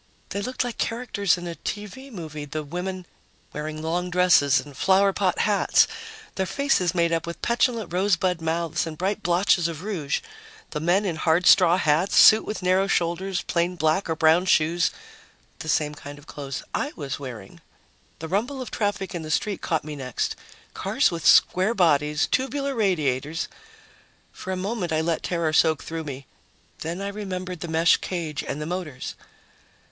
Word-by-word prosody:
They 200 - -3
looked 255 +5 -2
like 245 -3 -6
characters 225 -6 0
in 175 - -7
a 170 - -4
TV 210 - -7
movie, 155 -7 -7
the 155 +2 -5
women 180 +4 -5 0.5
wearing 155 +1 -5
long 175 +3 -1
dresses 180 -6 +4
and 145 - -9
flowerpot 190 +2 +2
hats, 205 -1 +3 0.5
their 190 -1 -2
faces 190 -11 +1
made 170 -1 +2
up 165 0 -1
with 170 0 -7
petulant 235 -6 0
rosebud 180 -2 +1
mouths 165 0 -1
and 155 -1 -7
bright 195 +4 -1
blotches 175 -1 +2
of 165 0 -6
rouge; 170 -9 -2 0.5
the 150 - -3
men 175 +6 +2
in 170 -5 -2
hard 165 +2 +2
straw 180 -2 +6
hats, 160 +3 +2
suits 215 - +8
with 210 -3 -4
narrow 185 +2 +3
shoulders, 180 +1 -1
plain 175 +1 0
black 160 +3 +1
or 160 - 0
brown 160 +3 +4
shoes 165 0 +3 0.7
the 160 - -6
same 150 -1 +1
kind 145 0 -10
of 145 - -15
clothes 140 -2 -6
I 290 - -2
was 140 -4 -5
wearing. 120 -8 -9 0.6
The 160 - -6
rumble 230 - -1
of 255 -3 -6
traffic 205 -3 -2
in 175 - -4
the 155 - -7
street 200 +6 -1
caught 160 -2 -1
me 155 -1 -6
next. 130 -4 -3 0.4
Cars - - +1
with 165 -2 -2
square 190 +6 +5
bodies, 150 -5 +3
tubular 275 +1 -1
radiators.... 160 - 0 0.8
For 190 - -7
a 185 - -2
moment, 190 -2 -3
I 160 0 +1
let 165 0 -1
terror 170 -3 -1
soak 160 -1 +3
through 165 -1 -5
me. 140 -2 -7 0.5
Then 170 +4 -4
I 200 - -3
remembered 185 -3 -5
the 170 - -5
mesh 165 +1 +4
cage 165 -5 -4
and 140 - -4
the 150 - -4
motors. 160 -6 -5
175 Hz, 175 wpm, -24 LUFS, 155-195 Hz, 0.8 s, suits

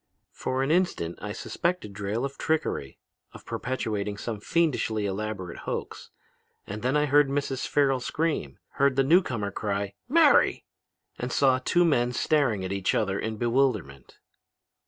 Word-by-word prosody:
For 130 +1 -2
an 135 - 0
instant 160 - 0
I 105 - -4
suspected 145 - -2
Drayle 105 +5 -2
of 140 0 -5
trickery, 155 - -1 0.4
of - - -13
perpetrating 105 -5 -3
some 110 0 -4
fiendishly 115 -7 0
elaborate 100 -3 -4
hoax. - - -5 0.6
And 105 +2 -6
then 130 +5 +1
I 150 - +3
heard 145 0 +4
Mrs. 140 -1 -2
Farrel 135 -2 +2
scream, 145 - -2 0.2
heard 140 -1 +3
the 135 - +3
newcomer 130 - +2
cry, 100 0 -2 0.2
'Mary,' 310 0 +4 0.5
and - - -3
saw 130 -2 +3
two 175 +7 +2
men 125 -6 +2
staring 120 -11 +1
at 95 - -3
each 100 -1 0
other 100 -3 0
in 110 -1 -3
bewilderment. 115 - -1
120 Hz, 145 wpm, -27 LUFS, 100-145 Hz, 0.6 s, heard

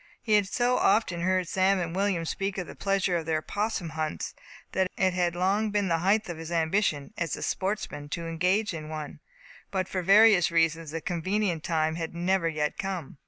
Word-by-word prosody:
He 220 - -1
had 205 -2 +4
so 245 +4 +1
often 185 -6 +2
heard 185 0 +1
Sam 190 +2 +2
and 170 -1 -3
William 190 -4 0
speak 195 +4 -3
of 180 - -2
the - - -10
pleasure 195 -2 +1
of 165 -1 -5
their 155 -1 0
'possum 205 -4 -2
hunts, 155 0 -3 0.4
that 190 -1 +1
it 185 -1 +2
had 175 -1 0
long 195 +4 +1
been 205 -2 0
the 165 -1 +2
height 200 +5 +2
of 170 -2 -6
his 165 +1 -7
ambition, 165 -1 0
as 170 -3 -1
a - - -6
sportsman, 190 -7 -3
to 170 +2 -4
engage 180 +5 +1
in 155 -2 -6
one; 155 -2 -6 0.5
but 185 -2 -1
for 185 - -2
various 200 -1 +6
reasons 165 -1 +1
the 165 +2 -4
convenient 180 0 -1
time 160 -1 0
had 165 0 -5
never 175 0 +1
yet 150 -2 -2
come. 180 -8 -4
180 Hz, 200 wpm, -27 LUFS, 165-195 Hz, 0.5 s, various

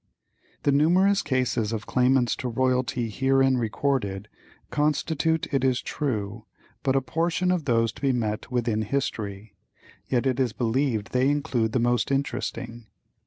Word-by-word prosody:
The 145 - +3
numerous 180 +8 +4
cases 125 -4 0
of 110 -2 -4
claimants 125 -1 +2
to 130 - -3
royalty 125 0 0
herein 135 +3 +2
recorded 110 -4 -1 0.4
constitute, 155 +2 +1
it 135 -2 +1
is 130 -1 +2
true, 110 -5 -3 0.3
but 135 -1 +1
a 135 - +3
portion 165 +7 0
of 175 -5 -1
those 115 -3 +2
to - - -15
be 135 -1 +2
met 110 -3 -2
with 120 -2 -1
in 110 -1 +1
history, 105 -4 -3 0.5
yet 125 0 0
it 130 -1 +1
is 125 -5 +1
believed 115 -2 -1
they 130 +2 +2
include 125 -6 0
the 125 - +2
most 120 +1 +1
interesting. 120 -4 -3
125 Hz, 150 wpm, -25 LUFS, 115-140 Hz, 0.5 s, numerous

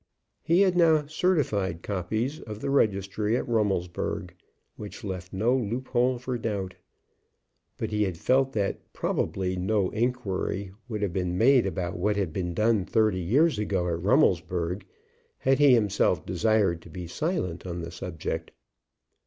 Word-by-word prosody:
He 170 +3 +3
had 185 -2 +4
now 160 -4 +4
certified 135 - 0
copies 110 - -2
of 105 -1 -8
the 140 - -2
registry 105 -2 +1
at - - -3
Rummelsburg, 100 -7 -1 0.4
which 105 +3 -9
left 90 -2 -5
no 110 +6 +2
loop 125 +1 -2
hole 125 0 +2
for 125 0 -4
doubt. 100 -5 -3 1.0
But - - -3
he 105 0 0
had 95 -5 0
felt 135 +7 +2
that 100 -2 -1
probably 95 -1 -1
no 95 +1 0
inquiry 100 -5 -2 0.2
would 105 -2 -3
have 95 -4 -1
been 90 -1 -1
made 125 0 +5
about 90 -1 -3
what 105 +3 +1
had 95 -6 -1
been 90 -2 -3
done 110 -1 +2
thirty 105 0 +2
years 130 - +3
ago 95 -4 0
at 85 0 -2
Rummelsburg, 90 - +1 0.5
had 135 +1 +2
he 140 -3 +7
himself 100 -6 +1
desired 90 -1 +1
to 85 - -14
be 90 +2 -7
silent 90 - -3
on 85 -1 -4
the 85 0 -6
subject. 85 0 -5
105 Hz, 155 wpm, -27 LUFS, 90-125 Hz, 1.0 s, he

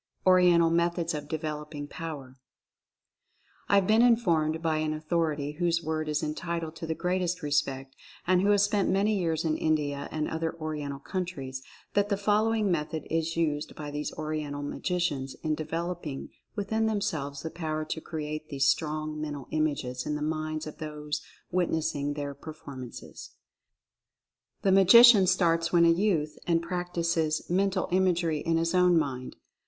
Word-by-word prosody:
ORIENTAL 180 -3 +5
METHODS 170 0 +1
OF 150 -1 -5
DEVELOPING 150 -1 -4
POWER. 145 -6 -7 1.3
I - - +5
have 200 -2 +4
been 220 +3 +4
informed 170 -10 +3
by 160 -1 0
an 155 0 -1
authority 155 -2 -1
whose 170 -1 +1
word 155 -1 -2
is 150 -1 0
entitled 165 +1 -3
to 165 - -6
the 160 - -1
greatest 180 0 -1
respect, 135 -2 -1 0.3
and 180 0 +3
who 200 - +2
has 205 -1 +5
spent 205 -1 +1
many 205 +3 +2
years 165 -4 0
in 155 -1 +1
India 145 -3 -1
and 155 -1 -1
other 160 0 -2
Oriental 150 -3 -4
countries, 140 -5 -5 0.3
that 205 0 +2
the 200 - +1
following 210 0 +2
method 155 -1 -2
is 165 0 -1
used 150 -3 -1
by 150 -1 -6
these 150 +1 -3
Oriental 150 -2 -4
Ma 145 - -4
gicians 150 -7 -1
in 155 -1 +1
developing 165 -2 -4 0.3
within 220 +1 0
themselves 150 -10 -2
the 160 - -4
power 155 -2 -3
to 160 +1 -4
create 155 -1 -5
these 140 -2 +1
strong 155 +1 -1
Mental 145 -3 -5
Images 140 -5 -1
in 150 - -1
the 150 - -3
minds 155 0 -2
of 155 - -9
those 150 -1 -4 0.3
witnessing 160 -5 0
their 145 -1 -4
performances: 140 -4 -10 1.3
The 195 - +4
Ma 195 +1 +6
gician 215 0 +8
starts 170 -2 +2
when 170 -1 +5
a 165 - +6
youth 165 -5 0
and 170 -1 +3
practices 170 -2 -1
Mental 190 +1 +1
Imagery 175 -4 +2
in 165 +2 0
his 165 +1 0
own 180 -1 +5
mind. 130 -5 -2
160 Hz, 160 wpm, -28 LUFS, 150-180 Hz, 1.3 s, gician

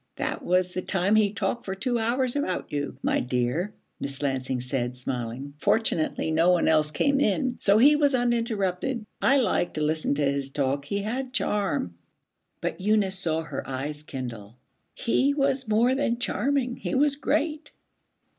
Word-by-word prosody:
'That - - -3
was 180 0 +1
the 185 - -2
time 190 +2 +1
he 210 -2 +4
talked 235 +3 -2
for 190 - -4
two 240 +4 -1
hours 245 +3 0
about 285 -11 -2
you, 145 -3 -3
my - - +2
dear,' 125 +10 -1 0.3
Miss 140 +1 -3
Lansing 130 -2 -1
said, 125 -1 -3
smiling. 125 +2 -4
'Fortunately 165 -7 +1
no 165 +2 +3
one 180 -1 +3
else 155 -1 +4
came 275 - +1
in, 250 +2 +1
so 200 +1 +4
he 285 +6 +7
was 285 -2 +3
uninterrupted. 235 -2 0 0.2
I 275 - +4
liked 215 -8 +1
to 155 - 0
listen 155 -1 0
to 145 - 0
his 140 0 0
talk; 140 0 -1
he 200 +5 -2
had 255 +4 -3
charm.' 195 - -1 0.7
But - - -3
Eunice 200 -2 +2
saw 160 -3 0
her 160 - -6
eyes 145 +3 -4
kindle. 120 -7 -7 0.4
'He 275 +4 +1
was 275 -3 0
more 225 +4 +3
than 260 -3 0
charming. 250 +2 0
He - - -3
was 285 +1 +3
great.' 305 +1 -1
190 Hz, 165 wpm, -26 LUFS, -, 0.7 s, he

